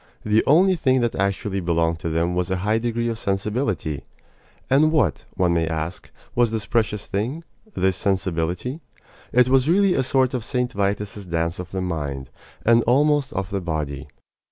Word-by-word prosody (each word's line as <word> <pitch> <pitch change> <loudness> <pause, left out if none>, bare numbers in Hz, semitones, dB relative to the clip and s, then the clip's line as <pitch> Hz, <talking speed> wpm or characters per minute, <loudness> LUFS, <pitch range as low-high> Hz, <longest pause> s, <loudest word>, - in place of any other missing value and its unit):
The 105 +1 +3
only 185 +6 +5
thing 130 -5 +2
that 120 -1 0
actually 100 0 -1
belonged 85 -2 0
to 80 - -3
them 85 +2 0
was 90 0 -1
a 95 - 0
high 110 +2 +2
degree 120 0 -1
of 115 -1 -3
sensibility. 100 - -2 0.6
And 150 +4 +4
what, 130 - +1
one 90 -2 +2
may 85 -1 +1
ask, 80 +2 -4 0.2
was 120 -1 +3
this 110 -2 -3
precious 105 -1 0
thing 120 +12 -3 0.3
this 95 -1 +1
sensibility? 95 - -1 0.5
It 125 0 +4
was 130 +2 +3
really 195 +1 +4
a 135 - +2
sort 130 0 +2
of 125 -3 -2
St. 125 +1 -1
Vitus's 100 -1 -2
dance 85 0 -1
of 90 -1 -6
the 95 0 -3
mind, 70 -7 -4 0.3
and 115 +1 +5
almost 145 +2 +3
of 95 -1 -3
the 100 -1 -2
body. 75 -5 -3
100 Hz, 175 wpm, -23 LUFS, 85-125 Hz, 0.6 s, only